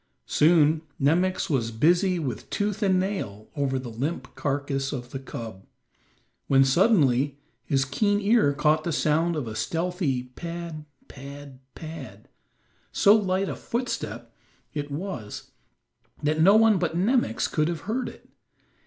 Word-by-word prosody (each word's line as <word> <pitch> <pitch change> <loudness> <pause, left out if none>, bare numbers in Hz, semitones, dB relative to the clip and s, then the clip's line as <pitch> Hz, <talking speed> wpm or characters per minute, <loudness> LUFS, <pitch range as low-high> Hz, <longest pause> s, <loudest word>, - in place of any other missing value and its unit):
Soon 155 0 +4 0.2
Nemox 175 +7 +2
was 125 -7 0
busy 175 - +2
with 140 -7 -4
tooth 205 +1 -2
and 190 -3 +3
nail 145 - -4
over 140 -2 0
the 130 -2 -6
limp 140 +9 -4
carcass 140 -1 -2
of 125 -4 -6
the 135 - -4
cub, 115 -7 -8 0.8
when 135 0 +5
suddenly 140 - +3 0.3
his 135 -1 +1
keen 205 +10 +1
ear 210 -6 +3
caught 150 +2 +2
the 170 - -2
sound 160 +2 +1
of 145 -6 -3
a 110 - -6
stealthy 165 - -1
pad, 165 +3 -7 0.2
pad, 140 0 -10 0.2
pad; 135 -11 -9 0.6
so 205 +1 +6
light 195 -2 +1
a - - -3
footstep 245 +2 -4 0.4
it 145 -2 -4
was 145 - -6 0.7
that 155 +2 +1
no 195 +5 +7
one 220 -3 +5
but 170 -1 -1
Nemox 240 +7 +1
could 155 -1 0
have 170 -3 -3
heard 230 - -2
it. - - -16
155 Hz, 140 wpm, -26 LUFS, 135-185 Hz, 0.8 s, no